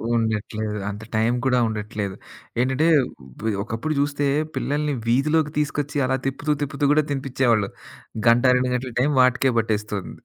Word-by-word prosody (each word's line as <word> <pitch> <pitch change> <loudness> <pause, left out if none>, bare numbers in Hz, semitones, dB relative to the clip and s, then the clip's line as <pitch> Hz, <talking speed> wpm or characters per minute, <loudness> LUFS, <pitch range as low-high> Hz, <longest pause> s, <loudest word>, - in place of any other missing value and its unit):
ఉండట్లేదు. 110 -1 -1
అంత 105 +2 -7
టైం 110 +2 +2
కూడా 125 -1 +3
ఉండట్లేదు. 105 -2 -4 0.4
ఏంటంటే 130 +6 +2 0.8
ఒకప్పుడు 115 +9 -3
చూస్తే 145 0 0 0.3
పిల్లల్ని 145 0 -1
వీధిలోకి 150 +5 +2
తీసుకొచ్చి 145 0 -2
అలా 130 0 +1
తిప్పుతూ, 145 +3 -1
తిప్పుతూ 140 0 -1
కూడా 155 - +3
తినిపిచ్చేవాళ్ళు. 125 -6 +1 0.6
గంట, 120 +2 +5
2 125 0 0
గంటల 125 -1 -4
టైం 145 +3 +2
వాటికే 130 +1 +3
పట్టేస్తుంది. 105 -3 -2
130 Hz, 130 wpm, -23 LUFS, 110-145 Hz, 0.8 s, గంట